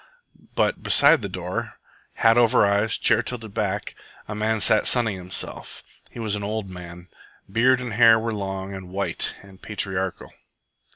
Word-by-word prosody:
But - - 0
beside - - +5
the - - -5
door, - - -5 0.4
hat 115 -1 +4
over 120 -3 +4
eyes, 100 +2 +1
chair 115 -1 +3
tilted 115 -4 -6
back, 105 -2 -3 0.3
a 105 - -5
man 110 +1 -1
sat 105 +1 +3
sunning 115 -5 +2
himself. 90 -1 -4 0.3
He - - -14
was 110 -3 -1
an 105 - -5
old 105 -1 -4
man. 90 -1 -10 0.4
Beard 125 +6 +3
and 125 -3 -5
hair 115 0 +6
were 115 0 -3
long 95 -1 -5
and 95 -2 -9
white 100 +2 -2
and 95 -1 -17
patriarchal. 95 -3 -3
105 Hz, 160 wpm, -23 LUFS, 95-115 Hz, 0.4 s, hair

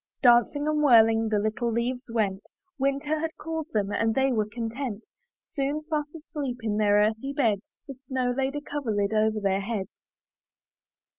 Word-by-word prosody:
Dancing 245 +4 +4
and 305 0 +1
whirling, 225 -5 +5
the 215 - +1
little 215 +3 -1
leaves 240 +2 -1
went, 205 -4 0 0.4
Winter 280 +3 0
had 320 0 -4
called 320 -1 -4
them 205 -2 0
and 225 +1 +1
they 270 0 +2
were 215 -3 0
content; 230 -1 -4 0.4
Soon, 285 +2 -3
fast 300 0 -2
asleep 295 -5 -5
in 210 -2 -1
their 205 -1 +3
earthy 220 +6 +1
beds. 225 -8 0
The 275 - -6
snow 255 -1 -2
laid 270 +1 -1
a 290 - -3
coverlid 220 -9 -2
over 215 0 +2
their 195 -1 +1
heads. 200 -2 -6
240 Hz, 160 wpm, -27 LUFS, 215-280 Hz, 0.4 s, whirling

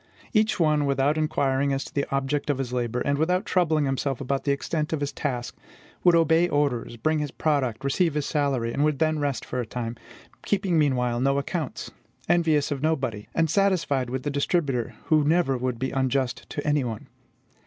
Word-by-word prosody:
Each 215 -2 +2
one, 150 -3 +3
without 140 +2 +2
inquiring 140 -3 +1
as 135 0 -1
to - - -11
the 140 - -1
object 140 +2 -1
of 145 - +1
his 130 -2 -4
labor, 125 -1 -1
and 140 0 0
without 180 +4 +1
troubling 160 -5 +2
himself 135 -1 -1
about 135 0 -2
the 140 - +2
extent 150 +3 -2
of 160 - 0
his 145 -1 -2
task, 125 -4 -3 0.5
would 175 -1 +6
obey 165 +1 +4
orders, 140 -6 0
bring 155 +7 +1
his 150 -1 -2
product, 135 -6 -1
receive 150 +3 +1
his 150 -1 0
salary, 135 -6 0
and 140 - +1
would 150 -2 +2
then 155 0 +1
rest 140 -3 -2
for 125 - -4
a - - -4
time; 115 0 -4 0.5
keeping 190 -5 +1
meanwhile 125 -5 +1
no 135 +2 +2
accounts, 145 0 -3 0.4
envious 160 -4 +2
of 140 -2 -2
nobody, 130 -9 -1
and 165 -1 +3
satisfied 165 -10 +1
with 130 +1 -3
the 145 - -2
distributor, 140 -4 0
who 155 -2 +3
never 155 -2 +2
would 125 -1 -2
be 130 +2 -2
unjust 130 -1 -1
to 145 - -5
any 145 -2 +2
one. 115 -3 -5
140 Hz, 195 wpm, -25 LUFS, 130-155 Hz, 0.5 s, would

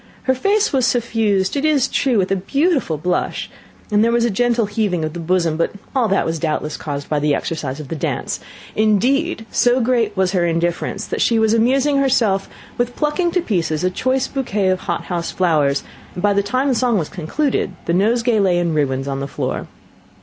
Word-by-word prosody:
Her 260 - +2
face 400 +10 +1
was 260 -2 +3
suffused, 220 -5 +1
it 280 - -1
is 300 -4 +3
true, 255 -4 +1
with 190 -1 +1
a - - +3
beautiful 275 - 0
blush, 180 +4 -2 0.4
and 210 +1 +4
there 230 - +3
was 235 0 +2
a 240 - +1
gentle 235 +2 +1
heaving 205 -5 -1
of 155 - -5
the 175 - -6
bosom, 170 -1 0
but 165 - 0 0.2
all 250 -4 +3
that 195 -1 +1
was 165 0 -2
doubtless 150 -1 -2
caused 145 -2 -5
by 150 - 0
the 145 0 +2
exercise 145 -4 -4
of 145 -3 -8
the - - -3
dance; 150 - -3 0.4
indeed, 225 - +1
so 245 +1 +3
great 235 -4 +1
was 190 -1 +2
her 185 -3 +1
indifference, 170 +4 -1
that - - -3
she 230 - +3
was 220 0 +3
amusing 265 +5 +2
herself 235 -8 +2 0.3
with 245 0 -1
plucking 305 +4 0
to 360 - +2
pieces 165 - -1
a 185 - +1
choice 260 +6 0
bouquet 210 -8 -1
of 185 0 +1
hothouse 170 -2 -3
flowers, 150 -6 +1 0.3
and 180 - -5
by 205 -1 +4
the 200 - +2
time 255 +7 0
the - - +3
song 240 -1 +2
was 160 -5 -1
concluded, 195 - -2
the 170 - 0
nosegay 225 +4 +2
lay 185 -3 +3
in 170 -2 0
ruins 135 -3 0
on 135 -1 -2
the 140 - -3
floor. - - -3
205 Hz, 205 wpm, -19 LUFS, 170-245 Hz, 0.4 s, and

